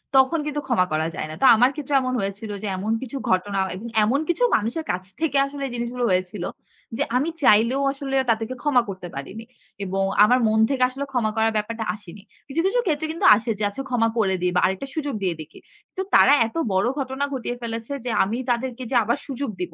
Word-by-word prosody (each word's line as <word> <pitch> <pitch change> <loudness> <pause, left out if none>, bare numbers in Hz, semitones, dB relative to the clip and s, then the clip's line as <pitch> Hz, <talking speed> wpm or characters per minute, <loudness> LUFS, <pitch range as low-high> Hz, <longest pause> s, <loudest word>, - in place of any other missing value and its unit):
তখন 265 +5 +4
কিন্তু 295 -1 -2
ক্ষমা 225 -8 +3
করা 155 +1 0
যায় 155 - -4
না। 155 - -7
তো - - +4
আমার 245 +4 +5
ক্ষেত্রে 290 -1 -5
এমন 255 0 -2
হয়েছিল 200 +2 -4
যে - - -2
এমন 210 +4 -2
কিছু 265 +1 -5
ঘটনা 195 +2 +1 0.2
এবং 225 +5 -7 0.2
এমন 255 +7 +2
কিছু - - +1
মানুষের 235 +10 -1
কাছ 180 +1 -3 0.2
থেকে 295 -4 +1
আসলে 280 0 -6
এই - - -8
জিনিসগুলো 240 +1 -2
হয়েছিল 185 0 -1 0.5
যে 285 - +1
আমি 295 +6 0
চাইলেও 230 +5 +4
আসলে 275 -1 -4
তাদেরকে 225 +2 0
ক্ষমা 275 -5 +4
করতে 185 -2 -6
পারিনি। 195 +11 -7 0.4
এবং 195 +1 -1 0.2
আমার 250 +4 +5
মন 220 0 +2
থেকে 260 -2 +1
আসলে 270 +2 -5
ক্ষমা 230 -4 0
করার 220 0 +2
ব্যাপারটা 225 +2 -3
আসেনি। 205 -1 -13 0.2
কিছু, 290 +4 -1
কিছু - - +2
ক্ষেত্রে 315 -1 0
কিন্তু 325 - -2
আসে 230 +2 -4
যে 210 - -2
আচ্ছা 270 +7 -6
ক্ষমা 235 -3 +2
করে 190 -4 +2
দিই 180 0 +1
বা - - +4
আরেকটা 190 +8 -2
সুযোগ 290 -4 -2
দিয়ে 180 -3 0
দেখি। 155 0 -12 0.4
তো - - 0
তারা 280 - +7
এত - - -14 0.2
বড় 190 +4 +2
ঘটনা 265 +1 -2
ঘটিয়ে 245 -2 -3
ফেলেছে 230 +2 -5
যে - - -2
আমি 210 +5 -2
তাদেরকে 250 +1 -1
যে - - 0
আবার 230 +3 0
সুযোগ 275 -1 -4
দিব। 175 -2 -4
235 Hz, 215 wpm, -23 LUFS, 205-270 Hz, 0.5 s, তারা